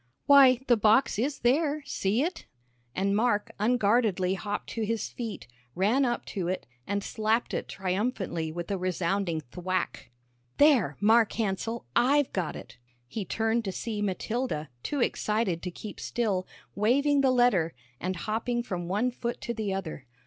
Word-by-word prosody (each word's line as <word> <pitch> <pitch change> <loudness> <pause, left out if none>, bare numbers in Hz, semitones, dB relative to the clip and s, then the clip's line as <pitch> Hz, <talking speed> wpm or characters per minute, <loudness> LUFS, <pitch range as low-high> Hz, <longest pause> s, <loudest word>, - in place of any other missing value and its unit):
"Why, 270 -3 +7
the 240 -3 +4
box 215 +2 +3
is 270 +4 -1
there. 295 +4 +2
See 225 -3 0
it," 350 +2 -4 0.5
and 200 +1 +1
Mark 215 -1 +1
unguardedly 210 -4 +2
hopped 205 +1 -4
to 230 - -3
his 225 +1 -1
feet, 230 -4 -6 0.3
ran 220 +9 +3
up 240 -1 -1
to 185 -5 -2
it, 185 +1 -2 0.2
and 200 0 -1
slapped 220 +3 0
it - - -2
triumphantly 185 -4 -2
with 175 +3 -5
a 195 - -1
resounding 180 -1 -1
thwack. 185 -5 -3 0.5
"There 250 - +4
Mark 220 +1 +4
Hansell, 225 +2 -2
I've 275 +4 +3
got 180 -5 -2
it!" 115 +1 -11 0.3
He 200 - -4
turned 225 +4 0
to 190 - -1
see 210 +2 -4
Matilda, 205 - -2
too 285 - -2
excited 210 -7 0
to 180 - -4
keep 205 +4 -9
still, 205 -6 -1 0.3
waving 280 +7 +3
the 270 - +4
letter, 245 - +3 0.2
and 185 +1 -2
hopping 230 +5 -2
from 175 -6 -4
one 210 +7 +1
foot 240 -1 -4
to 235 - -3
the 215 -3 -3
other. 165 -8 -5
215 Hz, 155 wpm, -28 LUFS, 185-240 Hz, 0.5 s, Why